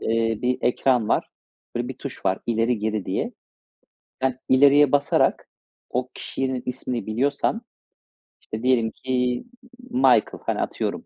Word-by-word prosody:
eee, 115 -1 0
bir 125 0 +1
ekran 125 -3 +2
var. - - +1 0.5
Böyle 120 +1 -2
bir 130 0 -7
tuş 140 - -8
var 95 - +2
ileri 115 0 +1
geri 110 -2 -2
diye. - - -2 0.9
Sen 130 -1 0
ileriye 140 +1 +6
basarak 145 0 +2 0.4
o 125 +1 -2
kişinin 130 -2 -3
ismini 125 -1 -3
biliyorsan 140 - 0 0.8
işte 110 +2 -7
diyelim 120 -3 +3
ki, 125 -1 -1 0.5
Michael, 250 +2 +3
hani, - - 0
atıyorum, - - -3
125 Hz, 130 wpm, -24 LUFS, 115-130 Hz, 0.9 s, ileriye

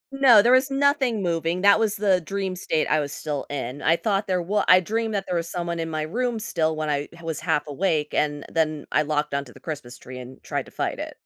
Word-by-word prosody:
No, 245 -6 +7
there 240 - +4
was 260 +1 +4
nothing 275 -5 +1
moving 170 0 -1
that 200 +2 +6
was 215 -2 +1
the 195 -3 +2
dream 195 +2 -3
state 160 -3 -1
I 155 - +2
was 145 -1 -3
still 145 -2 -4
in, 135 -1 -5
I 165 - +4
thought 205 +2 -1
there 185 -2 0
w 205 +4 +1
I 180 - +8
dreamed 220 +4 -2
that 195 -1 -2
there 180 - -3
was 170 0 -2
someone 170 -1 -3
in 165 0 -3
my 155 -1 -2
room 235 +8 -2
still 160 -6 -1
when 155 0 -3
I 145 0 -1
h 170 - -15
was 165 -2 -3
half 150 - 0
awake, 150 0 -1
and 145 -1 -1
then 155 -2 0
I - - +3
locked 150 -1 -1
onto 140 -3 -3
the - - -15
Christmas 140 -6 -7
tree 130 0 -10
and 125 +1 -11
tried - - -3
to - - -15
fight - - -3
it. - - -6
170 Hz, 250 wpm, -24 LUFS, 150-205 Hz, -, I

